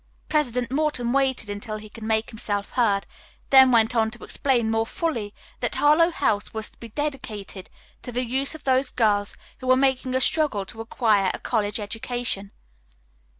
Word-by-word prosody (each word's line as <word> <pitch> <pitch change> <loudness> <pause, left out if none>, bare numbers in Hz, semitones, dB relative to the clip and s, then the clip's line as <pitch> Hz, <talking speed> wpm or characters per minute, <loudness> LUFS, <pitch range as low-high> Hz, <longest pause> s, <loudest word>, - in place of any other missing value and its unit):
President 250 -5 0
Morton 270 -4 0
waited 265 -5 +1
until 210 +2 -5
he 215 0 -10
could 225 +2 -13
make 220 0 0
himself 205 -2 -3
heard, 205 -5 +2 0.5
then 265 -1 +8
went 230 0 +4
on 220 -1 +3
to 240 +1 -9
explain 240 -5 0
more 225 0 +2
fully 235 -12 -2 0.3
that - - -2
Harlowe 305 +3 +5
House 220 -11 -1
was 220 -1 -3
to - - -25
be 230 - -9
dedicated 220 -8 -5 0.3
to 245 - -6
the 250 +1 -1
use 265 +5 -1
of 315 - -11
those 260 0 +2
girls 205 -4 +1 0.2
who 255 - -7
were 255 0 +5
making 260 -1 +1
a - - +3
struggle 270 -9 +1
to 225 +3 -6
acquire 215 -4 +2
a - - -9
college 210 0 -1
education. 220 -1 -3
235 Hz, 175 wpm, -24 LUFS, 215-265 Hz, 0.5 s, then